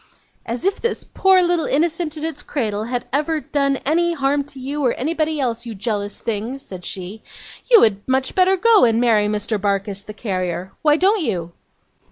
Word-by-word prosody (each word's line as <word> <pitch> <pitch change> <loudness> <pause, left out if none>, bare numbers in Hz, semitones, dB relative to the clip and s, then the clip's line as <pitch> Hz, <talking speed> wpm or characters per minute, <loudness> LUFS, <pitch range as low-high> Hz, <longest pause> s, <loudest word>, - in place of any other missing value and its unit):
'As 235 +7 -4
if 390 - 0
this 465 -1 -1
poor 380 -1 +3
little 345 -2 +1
innocent 320 +1 0
in 305 - -4
its 310 -3 -4
cradle 215 -6 -2
had 245 +1 -3
ever 305 +3 +1
done 280 -2 0
any 340 +4 +2
harm 280 -1 0
to 275 -1 -13
you 280 +3 -3
or 245 - +2
anybody 315 +2 -1
else, 235 -3 -1
you 225 - -6
jealous 205 -1 -3
thing!' 230 +3 -3
said 185 -9 -10
she. 190 +5 -6 0.5
'You 465 -3 +8
had 205 -2 +1
much 260 0 0
better 375 +1 +4
go 450 +2 +5
and 230 -2 +4
marry 220 -4 +3
Mr. 210 0 -2
Barkis, 200 0 -1
the 215 - -10
carrier. 185 -4 -3
Why 300 -1 +4
don't 390 +4 +3
you? 175 - -2
265 Hz, 190 wpm, -20 LUFS, 210-320 Hz, 0.5 s, You